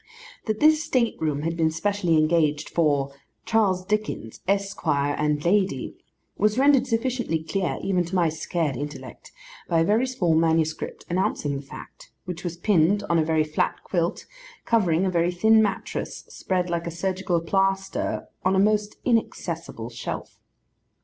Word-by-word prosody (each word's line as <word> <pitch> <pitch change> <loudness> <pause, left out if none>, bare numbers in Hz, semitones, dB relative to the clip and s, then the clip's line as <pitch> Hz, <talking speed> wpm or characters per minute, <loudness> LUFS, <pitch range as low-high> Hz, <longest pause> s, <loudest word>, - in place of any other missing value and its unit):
That 215 -2 -1
this 310 0 +5
state 245 -7 +1
room 150 -2 -1
had 165 +1 -1
been 160 -1 +2
specially 175 0 0
engaged 155 -1 +2
for 145 -4 +1 0.3
'Charles 195 -5 +2
Dickens, 210 - -3
Esquire, 165 -8 0
and 150 0 0
Lady,' 195 +2 +1 0.4
was 215 +2 +2
rendered 270 -1 +4
sufficiently 230 -8 -1
clear 185 +3 -2
even 185 -2 +1
to 175 +3 -5
my 175 -2 +3
scared 160 -2 -2
intellect 145 +3 -8 0.4
by 165 -1 +3
a - - +4
very 220 +8 +2
small 190 -11 +1
manuscript, 160 -1 0
announcing 170 -5 -1
the 135 - -4
fact, 135 - -12 0.2
which 180 -1 -6
was 175 -1 -4
pinned 195 +2 +3
on 170 - +4
a - - +3
very 160 0 +2
flat 155 0 -1
quilt, 170 -2 -1 0.4
covering 190 -6 +2
a 185 - 0
very 170 0 +2
thin 220 +5 +4
mattress, 205 -2 -3
spread 180 -1 -2
like 170 -1 -2
a - - -1
surgical 180 +1 -1
plaster 195 +3 -1 0.2
on 185 +1 +2
a - - +3
most 210 +1 +2
inaccessible 165 - -2
shelf. 115 - -6
175 Hz, 155 wpm, -25 LUFS, 160-205 Hz, 0.4 s, this